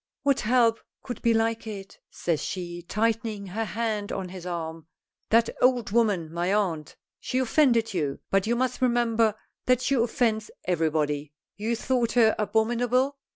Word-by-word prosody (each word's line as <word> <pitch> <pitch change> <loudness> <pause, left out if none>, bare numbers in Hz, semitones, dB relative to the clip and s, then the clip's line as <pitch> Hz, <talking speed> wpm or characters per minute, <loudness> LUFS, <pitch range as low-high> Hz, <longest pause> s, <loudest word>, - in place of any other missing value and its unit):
"What 280 -1 +3
help 230 0 +3 0.2
could 245 - -6
be 235 - +3
like 225 0 0
it?" 195 -2 -8
says 165 -4 -2
she, 175 -2 -5
tightening 220 +2 -1
her 215 +4 -3
hand 215 -1 -2
on 190 -2 -4
his 180 -1 -8
arm. 165 -2 -5 0.4
"That 230 +1 +4
old 245 -4 +3
woman, 200 -8 +1
my 175 +2 0
aunt. 180 -7 -1 0.2
She 255 - -3
offended 240 -4 +3
you, 145 -6 -2
but 195 +1 +2
you 235 - +2
must 255 +1 -1
remember 230 -3 +2 0.3
that 255 -1 +4
she 275 - 0
offends 230 -3 +1 0.2
everybody. 155 -4 0 0.2
You 220 +3 -1
thought 240 -1 0
her 225 -3 +5
abominable?" 240 +5 +1
220 Hz, 155 wpm, -26 LUFS, 180-235 Hz, 0.4 s, her